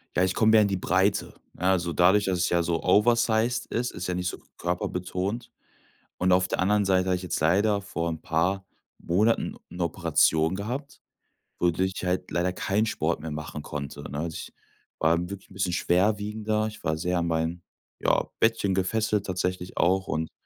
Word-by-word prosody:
Ja, 90 - +3
ich 95 - 0
komme 110 -1 +4
mehr 110 -1 +7
in 100 - +3
die 100 - -1
Breite. 95 +2 +1 0.2
Ja, 95 +1 +2
also 85 -2 0
dadurch, 95 +4 +4
dass 95 -2 0
es 90 - +2
ja 85 -1 +2
so 85 0 -1
oversized 115 +3 +3
ist, 125 +1 -2
ist 90 - -5
ja 90 - -1
nicht 90 0 -2
so - - -4 0.2
körperbetont. 90 +5 -3 0.7
Und 90 0 +2
auf 90 0 +4
der - - -2
anderen 100 +2 +2
Seite 95 -1 +3
habe 90 - +3
ich 90 - -5
jetzt 90 - -2
leider 100 +6 +3
vor 85 -4 -3
'n 80 -1 -4
paar 95 +5 0 0.3
Monaten 105 +7 +1
'ne 90 0 -3
Operation 80 0 +2
gehabt, 125 +8 -5 0.6
wodurch 90 +2 +1
ich - - -5
halt 90 0 -1
leider 90 +1 +1
keinen 100 +4 0
Sport 105 - -1
mehr 80 0 -5
machen 75 0 -6
konnte, 70 -1 -6
ne? 70 - -5
Also 80 0 -3
ich - - -7 0.5
war 80 +1 +3
dann 90 +2 -3
wirklich 100 -1 -9
'n - - -14
bisschen 95 -2 -1
schwerwiegender. 105 +4 +1
Ich 110 0 -8
war 80 - 0
sehr 90 +2 -1
an 85 0 0
mein, 80 +1 -1 0.4
ja, - - +2 0.2
Bettchen 115 -4 +2
gefesselt 105 +2 0
tatsächlich 90 -1 -3
auch 95 +2 +2
und 80 +1 -2
90 Hz, 195 wpm, -26 LUFS, 85-105 Hz, 0.7 s, mehr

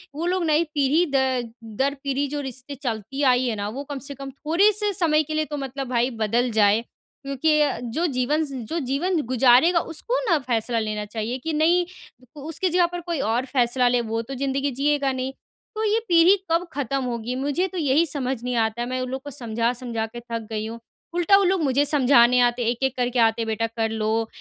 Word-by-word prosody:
वो 320 +3 -3
लोग 365 0 0
नई 310 +1 +3
पीढ़ी 290 +4 +3
द 260 -3 +1 0.3
दर 275 +1 +1
पीढ़ी 280 0 -1
जो 290 +1 -4
रिश्ते 265 +1 -7
चलती 245 0 -4
आई 255 -1 +4
हैं 230 - -1
न 205 - -3
वो 275 +3 -5
कम 280 - -4
से 280 - -6
कम 275 0 -7
थोड़े-से 400 +9 +2
समय 310 -3 +2
के 310 - -6
लिए 310 0 0
तो 295 -1 -5
मतलब 270 -1 -5
भाई 245 0 +1
बदल 230 +2 0
जाएँ। 215 0 +4 0.4
क्योंकि 275 +3 +1
अ, 290 -2 +1
जो 245 +8 -2
जीवन 285 +3 0
ज 280 - -9 0.2
जो 335 - -1
जीवन 310 +6 0
गुज़ारेगा 260 +7 +5
उसको 440 +11 -3
ना 335 - +4
फ़ैसला 235 -2 -1
लेना 215 -1 -3
चाहिए 220 +4 -4
कि 320 - -2
नहीं 335 +4 +3 0.5
उसकी 320 +5 -2
जगह 355 +1 +3
पर 350 0 -6
कोई 340 -4 -1
और 240 0 0
फ़ैसला 250 -1 +1
ले 245 0 +2
वो 225 0 -2
तो 230 +4 -8
ज़िंदगी 275 +1 -1
जिएगा 280 +1 +1
नहीं। 260 0 -3 0.4
तो 435 - -2
ये 435 +1 +2
पीढ़ी 340 +3 +6 0.2
कब 335 +2 +1
ख़त्म 275 -1 -2
होगी 240 0 -3
मुझे 285 +8 0
तो 375 - -8
यही 305 0 +3
समझ 265 -5 -3
नहीं 250 0 -2
आता 230 +2 -3
मैं 255 +1 -3
उन 255 - -3
लोग 265 +1 -4
को 290 - -7
समझा-समझा 235 -1 -2
के - - -4
थक 230 -2 -6
गई 215 -1 -2
हूँ। 230 +1 -7 0.4
उल्टा 350 +3 +5
वो 400 - +3
लोग 375 -1 +2
मुझे 280 +1 +2
समझाने 250 -4 +5
आते 245 0 +2
हैं 230 - +1
एक-एक 260 +2 -1
करके 245 0 0
आते 225 0 +3
हैं 225 - -3
बेटा 225 +1 -1
कर 225 -1 -2
लो 220 +1 -1
265 Hz, 215 wpm, -23 LUFS, 240-305 Hz, 0.5 s, पीढ़ी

